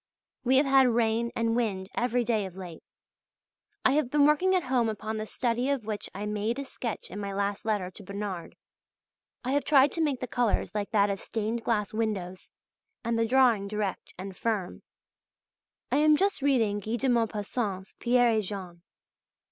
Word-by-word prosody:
We 260 +1 +4
have 280 - +4
had 270 -1 +5
rain 230 0 +1
and 230 0 +1
wind 200 -6 -1
every 245 0 +1
day 220 -4 0
of 185 0 -13
late. 175 -4 -8 1.0
I - - +6
have 285 -3 +1
been 290 +1 +4
working 360 +6 +4
at 365 - +1
home 250 -3 +1
upon 220 +1 -4
the 215 0 -4
study 245 +3 -1
of 275 -6 -1
which 210 -2 -4
I 205 +2 -4
made 210 +3 -1
a 280 - -4
sketch 235 -4 -5
in 205 - -6
my 200 -1 -4
last 200 +1 -2
letter 205 -4 -1
to 205 - -9
Bernard. 200 -2 -5 0.9
I 255 - -2
have 285 +1 +2
tried 280 -1 +5
to 330 - -2
make 290 -5 +1
the - - -3
colours 235 -5 0
like 205 -1 -2
that 205 -2 +3
of 195 - -3
stained 225 +1 -3
glass 210 -3 0
windows, 200 -5 -3 0.5
and 235 0 0
the 230 - +2
drawing 240 -5 +4
direct 210 -2 -4
and 190 +1 -7
firm. 210 -3 -2 1.1
I - - +3
am 305 0 +5
just 395 -3 +1
reading 230 -7 +2
Guy 220 +3 -3
de 265 +3 -1
Maupassant's 215 -4 -1
"Pierre 245 0 +4
et 220 -1 +2
Jean." 185 -4 -7
225 Hz, 185 wpm, -28 LUFS, 205-250 Hz, 1.1 s, I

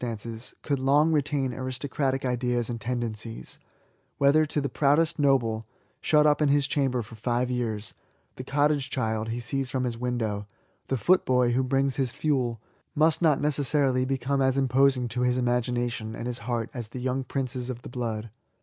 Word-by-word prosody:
stances^ 115 0 -6
could 140 -3 0
long 145 +4 +4
retain 145 -4 0
aristocratic 130 +1 -2
ideas 125 -1 0
and 115 -1 -5
tendencies; 115 -1 -4 0.6
whether 150 +3 +4
to 150 - -1
the 140 - -1
proudest 155 +4 +2
noble, 115 -6 +2 0.3
shut 150 -1 +4
up 150 0 +3
in 150 - +4
his 145 0 +3
chamber 135 -4 0
for 110 - -14
five 120 +3 -1
years^ 115 -4 -3 0.4
the 130 - -7
cottage 145 0 +1
child 110 -4 -1
he 115 +2 -2
sees 130 +2 -2
from 130 -1 -1
his 120 -2 -3
window, 110 -5 -2 0.4
the 135 - 0
footboy 125 - +3
who 125 +2 +2
brings 135 0 +1
his 130 -3 0
fiiel^ 130 -6 0 0.4
must 155 +2 +3
not 155 -5 +4
necessarily 140 -3 +1
become 135 +1 0
as 130 0 +2
imposing 135 -1 +3
to 120 +2 -3
his 125 0 +2
imagination 120 -2 -1
and - - -6
his 120 -1 -3
heart 115 -2 -1
as 120 -5 -5
the 120 +4 -7
young 130 +1 -1
princes 130 -2 -3
of 125 -1 -6
the - - -8
blood. 115 -3 -4
130 Hz, 175 wpm, -27 LUFS, 120-140 Hz, 0.6 s, long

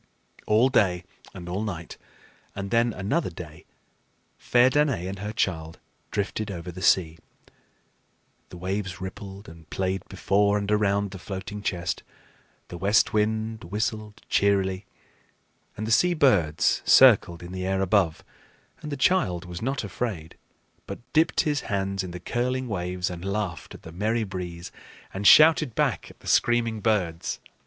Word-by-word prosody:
All 110 +5 +4
day 90 -8 +2 0.3
and 90 -3 -10
all 90 +4 -3
night 90 -6 -5 0.6
and 100 0 -5
then 120 0 +3
another 110 - -1
day, 80 -2 -11 0.7
fair 125 +1 +4
Danaë 130 - +1
and 95 0 -6
her 105 +2 -4
child 80 -7 -2 0.3
drifted 105 +1 -3
over 90 -2 -6
the 90 +2 -9
sea. 85 -3 +2 1.3
The 90 - -10
waves 95 -1 -3
rippled 95 +2 -8
and 80 -2 -14
played 95 0 -2
before 100 +2 +2
and 100 0 -2
around 100 -1 +1
the 95 - -8
floating 100 +2 -6
chest, 95 -2 -2 0.7
the 85 - -8
west 100 +4 +3
wind 110 +1 -1
whistled 105 0 -4
cheerily, 100 -1 +1 0.9
and 110 - -3
the 110 - -3
sea 175 +9 +4
birds 100 - +3
circled 85 0 +5
in 85 - -9
the 95 0 -4
air 95 0 0
above; 95 -4 +1 0.6
and 150 - -7
the 145 - -3
child 95 - +1
was 90 -1 -7
not 135 +2 -2
afraid, 95 -5 -4 0.5
but - - -5 0.2
dipped 160 +1 +3
his 150 -2 -1
hands 95 -1 -1
in 90 - -6
the 90 +1 -7
curling 125 +6 -2
waves 90 -3 -3
and 85 0 -7
laughed 95 -8 -4
at - - -14
the 80 - -10
merry 110 +6 -1
breeze 90 -3 -6 0.4
and 100 +1 0
shouted 155 -5 +7
back - - 0
at - - -18
the - - -13
screaming 115 -2 +2
birds. 90 -7 -1
100 Hz, 150 wpm, -25 LUFS, 90-110 Hz, 1.3 s, shouted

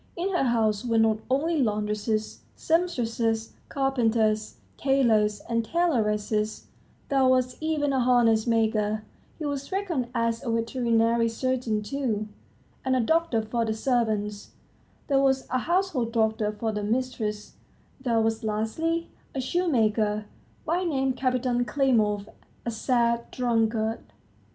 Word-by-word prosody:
In 360 +3 -1
her 355 -8 +1
house 220 -3 +1
were 230 -2 +1
not 220 -1 +3
only 300 +4 +1
laundresses, 210 -1 -1 0.2
sempstresses, 235 -9 0 0.2
carpenters, 225 -5 +1 0.2
tailors 220 -7 +2
and 230 -1 -1
tailoresses, 215 -9 0 0.5
there 270 -1 +3
was 255 -1 +2
even 305 -3 0
a 265 - +2
harness 240 -3 +3
maker 215 -2 +1 0.3
he 310 - -5
was 280 +1 -4
reckoned 365 -10 -1
as 230 -1 0
a 240 - -3
veterinary 230 0 +1
surgeon, 240 -3 -1
too, 225 -4 -2 0.6
and 260 0 +1
a - - +2
doctor 320 -3 +1
for 230 +2 -1
the 220 -1 -1
servants; 215 -4 -1 0.5
there 275 -2 +2
was 265 -1 +2
a 255 - +2
household 335 -7 0
doctor 220 -2 +1
for 220 +1 -3
the 210 -1 -3
mistress; 220 -2 -2 0.5
there 235 -3 +1
was, 225 0 0
lastly, 270 +11 -1 0.3
a - - -1
shoemaker, 220 -9 +1 0.4
by 345 +3 0
name 270 -6 0
Kapiton 255 -1 0
Klimov, 215 -5 +1 0.4
a 235 - -1
sad 235 0 +1
drunkard. 225 -2 0
235 Hz, 125 wpm, -26 LUFS, 220-270 Hz, 0.6 s, not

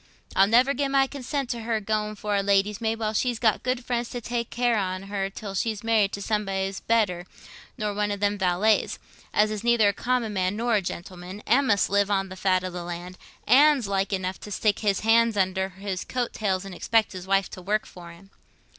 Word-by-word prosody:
I'll 195 +1 +5
never 250 +6 +4
gi' 280 +2 0
my 270 0 +3
consent 275 0 -4
to 235 - -3
her 225 -1 -1
going 215 0 -2
for 210 0 -2
a 200 - +2
lady's 200 +2 +1
maid, 225 0 0
while 215 -1 -2
she's 240 +2 0
got 220 -1 +2
good 255 -1 -2
friends 240 -1 -2
to 245 - -5
take 235 0 -3
care 240 -1 +1
on 185 -1 -3
her 195 -1 -3
till 200 0 -7
she's 215 +2 -2
married 220 -3 +2
to 200 - -4
somebody 195 -3 -1
better 195 -6 +1 0.5
nor 210 -3 -2
one 205 0 -1
o' - - 0
them 205 0 0
valets, 190 +4 +2 0.3
as 215 0 +3
is 215 0 -4
neither 235 -3 +4
a - - -1
common 240 -1 -1
man 185 0 0
nor 235 +2 0
a 210 - +3
gentleman, 180 +2 -7
an' 265 +4 +3
must 205 -3 +3
live 200 0 +2
on 195 -1 0
the 185 - -8
fat 185 -1 +1
o' 185 - -4
the 175 0 -6
land, 175 +1 -7 0.3
an's 275 -1 +5
like 195 0 -1
enough 185 -1 -2
to - - -9
stick 205 0 0
his 200 -3 +1
hands 225 0 +3
under 190 0 +1
his 190 0 -5
coat 245 -2 -3
tails 195 -3 -1
and 195 - -8
expect 220 +4 +1
his 185 -1 -8
wife 195 0 +2
to 185 - -8
work 210 +4 0
for 175 -1 -12
him." 195 +4 -17
205 Hz, 225 wpm, -25 LUFS, 195-230 Hz, 0.5 s, I'll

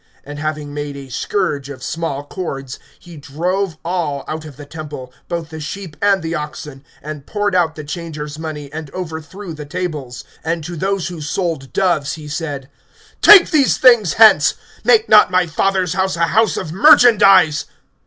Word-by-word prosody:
(15)And 145 +1 -8
having 150 -1 -4
made 145 -1 -5
a 135 -1 -10
scourge 145 -1 -2
of 140 - -9
small 165 -4 -3
cords, 135 -6 -6 0.2
he 175 -2 -14
drove 170 +5 -3
all 165 -6 -2
out 155 0 -5
of 145 -4 -12
the 145 - -10
temple, 145 -4 -9
both 170 -2 -4
the 160 -1 -8
sheep 165 +1 -7
and 200 -3 +2
the 160 +1 -3
oxen; 150 -3 -6 0.2
and 150 -1 -8
poured 205 -1 -1
out 170 -3 +1
the 155 - -7
changers' 150 -1 -7
money, 150 -3 -7
and 155 -2 -6
overthrew 175 +2 -7
the 150 -1 -8
tables; 145 -6 -5 0.2
(16)and 165 0 -2
to 175 +2 -6
those 190 +2 -2
who 175 -3 -8
sold 155 -3 -3
doves 175 -7 0
he 155 -2 -9
said: 145 -3 -5 0.5
Take 405 -4 +8
these 285 -4 +3
things 235 -9 +5
hence; 220 -1 +6 0.3
make 450 -1 +4
not - - +6
my 185 0 +2
Father's 185 +2 0
house 190 0 0
a 170 0 +2
house 225 0 +2
of 170 -5 -5
merchandise. 195 - +5
160 Hz, 175 wpm, -18 LUFS, 150-185 Hz, 0.5 s, Take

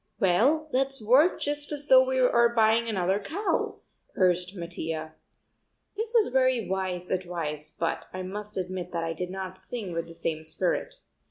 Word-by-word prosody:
"Well, 255 - +3
let's 270 +1 +1
work 260 +11 +4
just 290 0 -1
as 290 -1 -1
though 260 -2 +7
we 260 0 -1
are 235 -2 +4
buying 225 +1 +4
another 190 -1 +1
cow," 330 - -2 0.3
urged 180 0 +1
Mattia. 160 -3 -5 0.8
This 445 +2 -1
was 425 - +2
very 255 -4 +2
wise 185 -2 -2
advice 165 -5 -2
but 165 0 -3
I 185 0 -5
must 210 +2 -6
admit 180 -1 -4
that 170 -1 -1
I 165 0 -2
did 180 +2 -4
not 185 0 -6
sing 195 -2 -6
with 165 0 -3
the 165 - -12
same 160 -1 -3
spirit. 180 - -1
190 Hz, 165 wpm, -27 LUFS, 175-255 Hz, 0.8 s, though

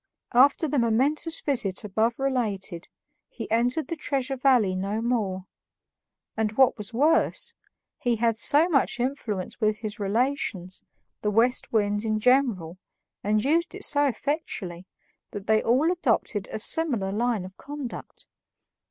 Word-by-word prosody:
After 275 +6 +5
the 290 -1 0
momentous 275 +8 +1
visit 215 -10 0
above 220 +3 0
related, 210 -10 -2 0.4
he 225 -3 -8
entered 245 +7 +1
the 335 - -3
Treasure 275 -3 -2
Valley 250 -8 +3
no 200 +3 -2
more; 210 -6 -1 0.9
and, 220 -1 -1
what 260 +3 +4
was 210 -1 -6
worse, 290 +8 +2 0.5
he 245 -1 +1
had 230 0 +1
so 300 +7 +4
much 275 -6 +1
influence 240 -6 -3
with 215 0 +2
his 215 -1 -6
relations, 205 - -1 0.4
the 210 - 0
West 230 +4 +2
Winds 205 -1 +1
in 215 -1 0
general, 215 -9 +2 0.4
and 210 +2 +1
used 335 +5 +1
it 400 - -4
so 290 0 +2
effectually, 220 - -4 0.4
that 205 -1 -7
they 220 0 +3
all 270 +9 +2
adopted 230 - 0
a - - -3
similar 230 -5 0
line 225 -2 0
of 185 +1 -11
conduct. 285 -3 -8
230 Hz, 140 wpm, -26 LUFS, 205-275 Hz, 0.9 s, After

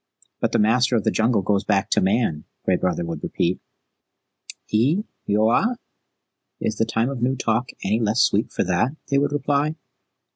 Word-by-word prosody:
"But - - 0
the - - +2
Master 125 +4 +3
of 110 - +1
the - - +2
Jungle 110 -2 +1
goes 100 +1 +1
back 100 -2 0
to - - +3
Man," 95 -6 +1 0.2
Gray 95 - +3
Brother 90 -1 -1
would 85 - -5
repeat. 85 +2 -1 1.1
"Eee 140 - +2 0.2
Yoawa? 110 - +2 0.8
Is 110 - -2
the 115 - +2
Time 115 +2 0
of 130 -4 -5
New 130 +2 +1
Talk 120 -1 -1
any 105 +4 +1
less 110 +1 +2
sweet - - +1
for - - 0
that?" 90 - 0 0.2
they 140 - +4
would 145 0 0
reply. 145 +1 0
115 Hz, 175 wpm, -22 LUFS, 100-130 Hz, 1.1 s, they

